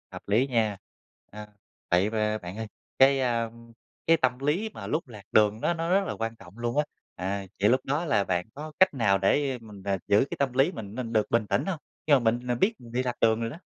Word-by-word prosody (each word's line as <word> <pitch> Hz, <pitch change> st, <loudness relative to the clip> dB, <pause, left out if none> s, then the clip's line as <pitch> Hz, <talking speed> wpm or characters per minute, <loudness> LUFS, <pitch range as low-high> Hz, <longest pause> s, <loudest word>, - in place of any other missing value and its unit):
Hợp -, -, -8 dB
lý 115 Hz, +7 st, +3 dB
nha. 110 Hz, -5 st, +1 dB, 0.5 s
À, 105 Hz, 0 st, -9 dB, 0.4 s
vậy 90 Hz, +4 st, +3 dB
b -, -, -10 dB, 0.3 s
bạn 90 Hz, +3 st, -7 dB
ơi. 110 Hz, 0 st, -4 dB, 0.3 s
Cái, 135 Hz, +1 st, +6 dB
a, 120 Hz, -3 st, 0 dB, 0.6 s
cái 165 Hz, 0 st, +6 dB
tâm 130 Hz, -3 st, 0 dB
lý 155 Hz, +11 st, 0 dB
mà -, -, -7 dB
lúc 155 Hz, 0 st, -1 dB
lạc 105 Hz, -5 st, -11 dB
đường 110 Hz, +1 st, +3 dB
nó 170 Hz, -, +2 dB
nó 165 Hz, 0 st, -3 dB
rất 195 Hz, +2 st, +3 dB
là -, -, -2 dB
quan 115 Hz, 0 st, -3 dB
trọng 95 Hz, -1 st, -15 dB
luôn 120 Hz, +2 st, -2 dB
á. 150 Hz, -, +4 dB, 0.3 s
À, 95 Hz, +1 st, -3 dB
những 105 Hz, +3 st, +4 dB
lúc 130 Hz, +1 st, +3 dB
đó 145 Hz, +5 st, 0 dB
là 105 Hz, -10 st, +2 dB
bạn 90 Hz, -2 st, -1 dB
có 155 Hz, +2 st, -7 dB
cách 190 Hz, -2 st, +6 dB
nào 110 Hz, -7 st, +3 dB
để, 135 Hz, +9 st, +2 dB
a, 130 Hz, -, -4 dB
mình 105 Hz, -3 st, -12 dB
về 100 Hz, -, -2 dB
mình 95 Hz, -, 0 dB
giữ 105 Hz, +6 st, +4 dB
cái -, -, -4 dB
tâm 135 Hz, -3 st, +1 dB
lý 135 Hz, +6 st, +3 dB
mình 105 Hz, -, -8 dB
mình 120 Hz, -2 st, -4 dB
được 110 Hz, -1 st, +2 dB
bình 115 Hz, -2 st, +2 dB
tĩnh -, -, 0 dB
hông? 190 Hz, -5 st, -2 dB, 0.3 s
Khi 150 Hz, -, +5 dB
mà 140 Hz, -, +7 dB
mình 120 Hz, 0 st, +1 dB
mình 120 Hz, -1 st, -1 dB
biết 215 Hz, +4 st, +3 dB
mình 120 Hz, -1 st, -13 dB
bị 125 Hz, +2 st, 0 dB
lạc 125 Hz, -1 st, -2 dB
đường 110 Hz, 0 st, +3 dB
rồi 115 Hz, -, -1 dB
đó. 150 Hz, -, -8 dB
120 Hz, 265 wpm, -27 LUFS, 105-140 Hz, 0.6 s, mà